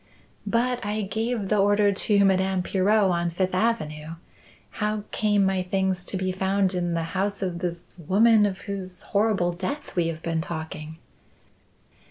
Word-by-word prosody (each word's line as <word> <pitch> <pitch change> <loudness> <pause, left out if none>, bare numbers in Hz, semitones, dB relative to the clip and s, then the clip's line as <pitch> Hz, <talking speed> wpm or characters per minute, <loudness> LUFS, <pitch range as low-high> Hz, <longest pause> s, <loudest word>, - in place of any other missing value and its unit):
"But 245 +3 0
I 210 +1 -2
gave 220 +1 -2
the 210 - +2
order 205 +1 +4
to 200 0 +3
Madame 190 -1 +2
Pirot 195 +1 +2
on 170 0 0
Fifth 185 +2 -1
Avenue. 165 -7 -1 0.7
How 210 0 0
came 205 -2 +2
my 190 -1 +1
things 190 0 -1
to 190 - -3
be 185 0 -1
found 190 +1 +1
in 175 -2 -1
the 165 - -1
house 200 +1 -1
of 175 -2 -3
this 170 -1 -4 0.2
woman 215 +1 +5
of 190 -1 -5
whose 190 -2 -6
horrible 200 -4 +1
death 190 +12 -5
we 175 -2 +2
have 165 -1 -5
been 165 -1 -1
talking?" 160 -1 -6
190 Hz, 160 wpm, -25 LUFS, 180-205 Hz, 0.7 s, woman